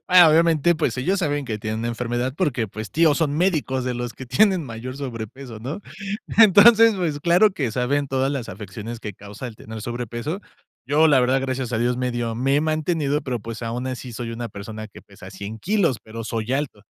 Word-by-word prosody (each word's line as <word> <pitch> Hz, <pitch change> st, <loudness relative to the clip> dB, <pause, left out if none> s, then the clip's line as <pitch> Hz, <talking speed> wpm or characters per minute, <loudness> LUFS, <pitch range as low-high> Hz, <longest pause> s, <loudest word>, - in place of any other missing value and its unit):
Ah, 180 Hz, -2 st, +9 dB
obviamente, 165 Hz, 0 st, +4 dB
pues, 150 Hz, -7 st, -1 dB
ellos 180 Hz, +10 st, 0 dB
saben 145 Hz, -5 st, -1 dB
que 110 Hz, -4 st, -4 dB
tienen 110 Hz, 0 st, -3 dB
una 115 Hz, -, -2 dB
enfermedad 120 Hz, +2 st, -2 dB
porque, 140 Hz, -11 st, 0 dB
pues, 110 Hz, 0 st, -7 dB
tíos, 160 Hz, -2 st, +3 dB
son 150 Hz, -3 st, 0 dB
médicos 155 Hz, -7 st, +1 dB
de 125 Hz, -, -1 dB
los 120 Hz, -1 st, -4 dB
que 130 Hz, -, -8 dB
tienen 185 Hz, -, +3 dB
mayor 125 Hz, +1 st, -7 dB
sobrepeso, 125 Hz, -2 st, -7 dB
¿no? 135 Hz, -, -5 dB, 0.6 s
Entonces, 225 Hz, +2 st, +8 dB
pues, 160 Hz, -6 st, -1 dB
claro 175 Hz, +6 st, +5 dB
que 135 Hz, -10 st, -2 dB
saben 135 Hz, +4 st, 0 dB
todas 135 Hz, 0 st, 0 dB
las 135 Hz, -5 st, -4 dB
afecciones 105 Hz, +4 st, -7 dB
que 105 Hz, -2 st, -6 dB
causa 105 Hz, +6 st, -9 dB
el 115 Hz, -, -10 dB
tener 110 Hz, 0 st, -9 dB
sobrepeso. 120 Hz, -, -4 dB, 0.5 s
Yo, 150 Hz, +5 st, +4 dB
la 145 Hz, -4 st, +5 dB
verdad, 130 Hz, +2 st, +2 dB
gracias 130 Hz, -2 st, -3 dB
a 115 Hz, -, 0 dB
dios 120 Hz, +2 st, +1 dB
medio 120 Hz, -2 st, -2 dB
me 135 Hz, +4 st, +1 dB
he -, -, +2 dB
mantenido, 155 Hz, -2 st, 0 dB
pero, 130 Hz, -4 st, -3 dB
pues, 115 Hz, +1 st, -7 dB
aun 120 Hz, +2 st, -3 dB
así 130 Hz, -1 st, -5 dB
soy 115 Hz, +1 st, -5 dB
una 115 Hz, 0 st, -5 dB
persona, 110 Hz, +2 st, -8 dB
que -, -, -14 dB
pesa -, -, -13 dB
100 105 Hz, +2 st, -7 dB
kilos, 175 Hz, -, +1 dB
pero 115 Hz, +1 st, -7 dB
soy 115 Hz, +1 st, -3 dB
alto. 135 Hz, -7 st, -2 dB
130 Hz, 205 wpm, -23 LUFS, 115-155 Hz, 0.6 s, Ah